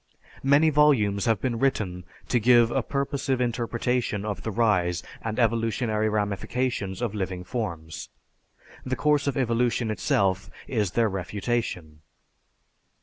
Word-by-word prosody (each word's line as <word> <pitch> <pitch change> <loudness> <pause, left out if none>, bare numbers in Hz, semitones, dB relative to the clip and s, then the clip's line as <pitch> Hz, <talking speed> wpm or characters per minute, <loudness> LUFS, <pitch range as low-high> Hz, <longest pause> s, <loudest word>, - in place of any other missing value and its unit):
Many 145 +4 +4
volumes 125 -10 +3
have 115 -4 +2
been 120 -1 -2
written 100 -10 -1 0.2
to 120 - +3
give 120 0 +5
a - - +1
purposive 140 -2 -1
interpretation 120 -2 -1
of 100 -3 -3
the 110 - -4
rise 95 -6 +1 0.2
and 110 -1 -4
evolutionary 115 -1 +1
ramifications 105 +1 -2
of 115 -4 -1
living 95 -3 -3
forms. 85 -7 -5 0.7
The 130 0 -2
course 150 0 +2
of 140 - 0
evolution 120 -2 +1
itself 95 -2 0 0.2
is 105 -7 -1
their 115 -1 +3
refutation." 95 -4 -3
115 Hz, 125 wpm, -26 LUFS, 100-125 Hz, 0.7 s, give